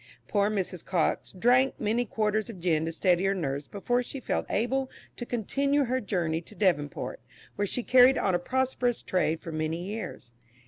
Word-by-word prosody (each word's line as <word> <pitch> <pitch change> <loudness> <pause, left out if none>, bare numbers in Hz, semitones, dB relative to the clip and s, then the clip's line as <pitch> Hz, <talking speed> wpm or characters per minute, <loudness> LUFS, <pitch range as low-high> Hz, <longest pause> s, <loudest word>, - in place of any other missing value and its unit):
Poor 205 -1 +2
Mrs. 185 -4 -3
Cox 175 -4 0
drank 250 +7 +3
many 225 +3 +1
quarterns 215 0 0
of 205 -6 -8
gin 165 -3 +1
to - - -1
steady 180 +1 +2
her 195 0 +2
nerves 140 -5 -3
before 245 +5 0
she 270 +2 -6
felt - - -2
able 260 +4 0 0.3
to 240 - -6
continue 275 +5 +1
her 255 +2 0
journey 170 -5 -1
to 210 - -14
Devonport, 160 -9 0 0.4
where 205 0 0
she 245 - -3
carried 255 +2 +6
on 190 - +1
a 175 - +2
prosperous 250 +3 0
trade 165 -3 0
for 165 - -7
many 155 +2 -2
years. 205 - -6
205 Hz, 180 wpm, -28 LUFS, 175-245 Hz, 0.4 s, carried